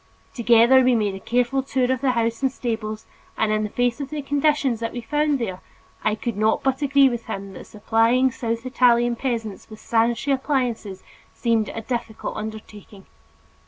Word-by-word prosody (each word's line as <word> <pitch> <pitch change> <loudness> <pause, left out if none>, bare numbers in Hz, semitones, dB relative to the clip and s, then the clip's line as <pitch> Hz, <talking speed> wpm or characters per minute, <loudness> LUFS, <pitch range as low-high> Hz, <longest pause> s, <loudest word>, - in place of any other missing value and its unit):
Together 235 +2 +5
we 255 -1 +3
made 210 -3 0
a 190 - -7
careful 245 +5 0
tour 260 -1 0
of 260 -1 -1
the 265 -2 +2
houses 230 0 -1
and 265 -1 +1
stables 220 -4 -4 0.3
and 220 -1 +1
in 215 0 +1
the 210 - -2
face 245 +4 0
of 280 - -5
the 300 -2 -5
conditions 285 -4 +1
that 230 0 -4
we 245 - -4
found 295 +5 0
there, 190 -7 -4 0.4
I 215 - +1
could 230 0 -4
not 215 +2 +1
but 270 +1 0
agree 280 -1 +5
with 240 -3 -3
him 195 -3 -6
that - - -10
supplying 230 +4 +2
South 230 0 -4
Italian 240 -2 +3
peasants 230 -6 -4
with 215 -1 -11
sanitary 235 +4 +1
appliances 250 -8 -2 0.3
seemed 230 -3 +1
a 225 - -5
difficult 235 -2 -4
undertaking. 210 -2 -9
235 Hz, 180 wpm, -23 LUFS, 220-260 Hz, 0.4 s, Together